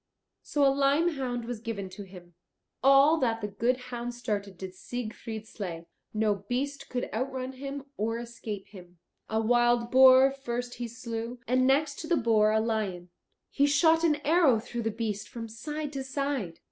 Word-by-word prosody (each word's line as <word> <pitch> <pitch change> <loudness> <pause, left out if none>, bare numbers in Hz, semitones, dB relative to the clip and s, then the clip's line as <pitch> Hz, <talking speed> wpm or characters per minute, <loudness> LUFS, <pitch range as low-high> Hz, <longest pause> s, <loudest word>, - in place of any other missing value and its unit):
So 290 -1 +1
a 270 - +5
lime 280 +5 +3
hound 250 -6 -3
was 240 -2 -5
given 215 -4 -4
to 195 +2 -9
him. 180 -3 -12 0.5
All 275 +4 +6
that 230 -4 +1
the 210 - -2
good 230 +5 0 0.2
hound 240 0 -4
started 205 -5 -3
did 185 0 -7
Siegfried 220 +1 -6
slay; 170 -7 -6 0.3
no 215 -1 +2 0.2
beast 275 +3 -2
could 250 -1 -2
outrun 260 +2 -3
him 275 +1 -7
or 225 +2 -1
escape 230 -4 -7
him. 180 -3 -14 0.3
A 220 - +1
wild 240 +1 +2
boar 260 +1 +8
first 245 -2 -5
he 240 - -2
slew, 235 0 -5
and 255 +2 +3
next 280 +1 +2
to 320 - -6
the 340 0 +2
boar 220 -3 +3
a 220 - +3
lion; 205 -6 -2 0.4
he 285 - +3
shot 320 +3 +4
an 320 -3 +4
arrow 310 -6 +5
through 240 +1 -5
the 225 - 0
beast 215 -2 -4
from 230 -1 -6
side 295 +6 -5
to 270 -1 -3
side. 265 - -3
240 Hz, 175 wpm, -28 LUFS, 220-275 Hz, 0.5 s, boar